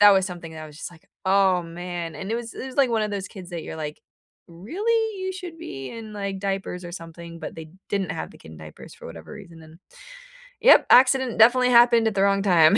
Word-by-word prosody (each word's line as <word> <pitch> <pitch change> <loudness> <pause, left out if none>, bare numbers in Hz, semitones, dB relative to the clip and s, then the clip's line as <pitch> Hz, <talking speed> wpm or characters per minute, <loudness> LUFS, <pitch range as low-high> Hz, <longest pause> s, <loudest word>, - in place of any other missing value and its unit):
that 205 0 +9
was 190 -1 +3
something 170 -3 -8
that 155 0 -8
I - - -9
was 150 -1 -14
just - - -6
like, 165 -2 -19 0.2
"Oh, 190 -2 +3
man," 170 0 -6
and 195 - -6
it - - 0
was 235 -1 -7
it - - -6
was 260 - -9
like 275 -3 +4
one 225 -2 +1
of 210 - -2
those 195 -1 -4
kids 185 -3 -11
that 170 -2 -5
you're - - -7
like, 150 -1 -6 0.5
"Really? 405 - -1
You 375 0 -2
should 355 -3 -8
be 135 - -7
in, 225 -2 -9
like, 200 -1 -4
diapers 195 -2 -3
or 175 - -8
something," 170 0 -9
but - - -7
they 160 -1 -9 0.2
didn't 195 -4 -1
have - - -5
the - - -16
kid 80 - -13
in - - -12
diapers 80 0 -12
for - - -16
whatever - - -10
reason, 165 -1 -12
and, 160 +1 -16 0.8
yep, - - +7
accident 260 -2 +5
definitely 250 +3 +6
happened 235 -1 +6
at 210 - -4
the 195 - +3
wrong 195 0 +3
time. 175 -1 +5
195 Hz, 245 wpm, -24 LUFS, 170-235 Hz, 0.8 s, that